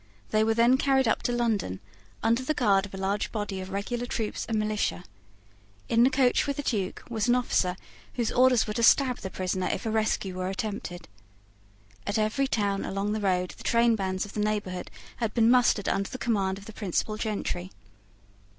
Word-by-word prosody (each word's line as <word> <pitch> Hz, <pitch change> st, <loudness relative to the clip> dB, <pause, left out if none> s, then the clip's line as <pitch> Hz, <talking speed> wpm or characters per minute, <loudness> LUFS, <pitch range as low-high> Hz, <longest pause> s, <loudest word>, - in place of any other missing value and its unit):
They 215 Hz, 0 st, +3 dB
were 225 Hz, 0 st, +2 dB
then 235 Hz, +3 st, +5 dB
carried 265 Hz, -3 st, +3 dB
up 225 Hz, -, +1 dB
to -, -, -1 dB
London, 225 Hz, -, 0 dB, 0.4 s
under 230 Hz, +3 st, +3 dB
the 305 Hz, +4 st, -1 dB
guard 200 Hz, -6 st, +3 dB
of 195 Hz, -, -20 dB
a -, -, -6 dB
large 195 Hz, +2 st, -1 dB
body 205 Hz, -3 st, -3 dB
of 185 Hz, -, -7 dB
regular 235 Hz, +5 st, -3 dB
troops 220 Hz, -3 st, -3 dB
and 225 Hz, -, 0 dB
militia. 215 Hz, -4 st, -1 dB, 0.9 s
In 230 Hz, -, +4 dB
the 250 Hz, -, +6 dB
coach 260 Hz, -1 st, +2 dB
with 280 Hz, -, -2 dB
the 290 Hz, -, -3 dB
Duke 205 Hz, -8 st, -2 dB
was 225 Hz, -2 st, -1 dB
an 240 Hz, -, +4 dB
officer 185 Hz, -7 st, +1 dB, 0.4 s
whose 235 Hz, -3 st, 0 dB
orders 250 Hz, -2 st, +4 dB
were 210 Hz, -, -3 dB
to 235 Hz, -, -2 dB
stab 255 Hz, +2 st, +4 dB
the 190 Hz, -, -5 dB
prisoner 185 Hz, 0 st, -2 dB
if -, -, -4 dB
a 220 Hz, -, -1 dB
rescue 215 Hz, -3 st, 0 dB
were 185 Hz, 0 st, -2 dB
attempted. 190 Hz, -3 st, -5 dB, 1.0 s
At 205 Hz, -, 0 dB
every 220 Hz, +6 st, +1 dB
town 200 Hz, -5 st, 0 dB
along 195 Hz, +2 st, -2 dB
the 215 Hz, 0 st, -2 dB
road 180 Hz, -2 st, +1 dB
the -, -, -12 dB
trainbands 215 Hz, -5 st, +2 dB
of 205 Hz, -, -11 dB
the -, -, -4 dB
neighbourhood 205 Hz, -4 st, -2 dB, 0.3 s
had 230 Hz, -3 st, -2 dB
been 230 Hz, -1 st, +5 dB
mustered 245 Hz, -5 st, +3 dB
under 195 Hz, 0 st, 0 dB
the -, -, -6 dB
command 195 Hz, -6 st, 0 dB
of 200 Hz, -, -12 dB
the 220 Hz, -, -10 dB
principal 205 Hz, +1 st, -2 dB
gentry. 200 Hz, -4 st, -3 dB
215 Hz, 195 wpm, -27 LUFS, 195-235 Hz, 1.0 s, the